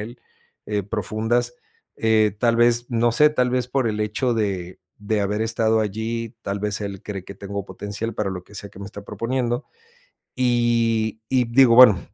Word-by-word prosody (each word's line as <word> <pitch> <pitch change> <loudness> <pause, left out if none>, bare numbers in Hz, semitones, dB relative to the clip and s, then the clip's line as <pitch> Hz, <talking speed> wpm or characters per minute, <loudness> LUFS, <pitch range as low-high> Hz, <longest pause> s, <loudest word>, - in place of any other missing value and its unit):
él, 120 +3 -8 0.5
eh, 105 -1 -1
profundas, 115 +4 -1 0.4
eh, 110 -2 +2
tal 115 0 +2
vez, 120 0 +4
no 120 0 +2
sé, 150 +6 +5
tal 125 -4 +1
vez 125 0 0
por 130 -2 0
el 105 -1 -2
hecho 115 +4 0
de 95 -5 -2 0.2
de 105 0 -1
haber 105 +2 -1
estado 110 0 +1
allí, 110 +2 -3
tal 100 +1 -3
vez, 105 0 -2
él 100 -2 -5
cree 95 -3 -6
que 100 - -10
tengo 100 0 -5
potencial 105 +4 -5
para 100 -2 -2
lo 90 -1 -6
que 105 +2 -12
sea 100 - -5
que 100 - -14
me - - -6
está 100 +1 -9
proponiendo. 120 +1 -2 0.7
Y 115 -3 +1
y 130 -2 +3
digo: 120 0 +5
"Bueno, 120 -6 +8
110 Hz, 185 wpm, -22 LUFS, 100-120 Hz, 0.7 s, Bueno